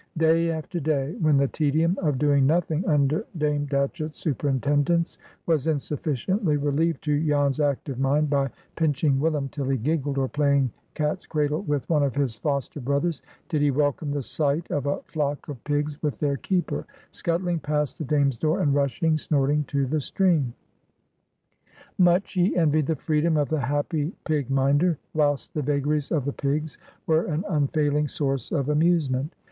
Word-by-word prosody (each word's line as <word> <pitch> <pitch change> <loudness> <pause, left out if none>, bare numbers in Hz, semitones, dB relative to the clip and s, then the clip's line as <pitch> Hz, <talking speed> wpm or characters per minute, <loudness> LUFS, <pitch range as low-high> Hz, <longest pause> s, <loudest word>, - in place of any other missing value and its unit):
Day 165 +1 +3
after 165 +2 -3
day, 145 -1 -1
when 155 -3 +4
the 140 0 +3
tedium 160 +5 +1
of 150 -6 +1
doing 140 -1 +3
nothing 160 +1 +1
under 150 +3 +2
Dame 150 -1 0
Datchett's 150 +3 -2
superintendence 145 +3 0 0.3
was 160 -3 +1
insufficiently 150 - 0
relieved 145 +3 0
to 150 0 +1
Jan's 145 -2 +1
active 140 -2 -1
mind 145 +3 +2
by 140 -1 +1 0.3
pinching 150 -3 +1
"Willum" 150 -2 0
till 140 -2 -3
he 135 - +2
giggled, 145 +2 -1
or 135 -1 +1
playing 140 -3 +2 0.2
cat's 150 +4 -2
cradle 150 +1 0
with 145 -8 -2
one 155 -3 +2
of 140 -2 0
his 140 -4 0
foster 140 +4 -3
brothers, 140 +4 -1 0.3
did 155 -4 0
he 145 - +4
welcome 145 +1 0
the 145 -1 -2
sight 150 +4 -1
of 145 -1 -1
a 145 - -1
flock 145 -2 -3
of 140 -5 -8
pigs 145 0 -1
with 150 -3 -1
their 140 -2 0
keeper, 180 +5 -2 0.2
scuttling 170 0 -1
past 150 +1 -2
the - - -2
Dame's 140 -3 +1
door, 155 +1 +1
and 145 - +2
rushing 155 +3 +1
snorting 145 0 +1
to 140 -1 0
the 150 +3 -1
stream. 155 -7 +1 1.4
Much 180 +1 +3
he 180 0 +2
envied 155 -3 +2
the 160 - +1
freedom 155 +2 +1
of 145 -2 +1
the 155 -1 0
happy 145 +5 -1
pig 150 -5 -1
minder, 140 +5 +2 0.2
whilst 145 -2 0
the 150 - -1
vagaries 145 +1 0
of 150 -6 0
the 140 - -2
pigs 150 +2 -2 0.3
were 160 +1 +2
an 165 +4 -2
unfailing 150 -1 +1
source 135 -3 -2
of 140 -5 0
amusement. 150 -2 +1
150 Hz, 165 wpm, -25 LUFS, 140-160 Hz, 1.4 s, when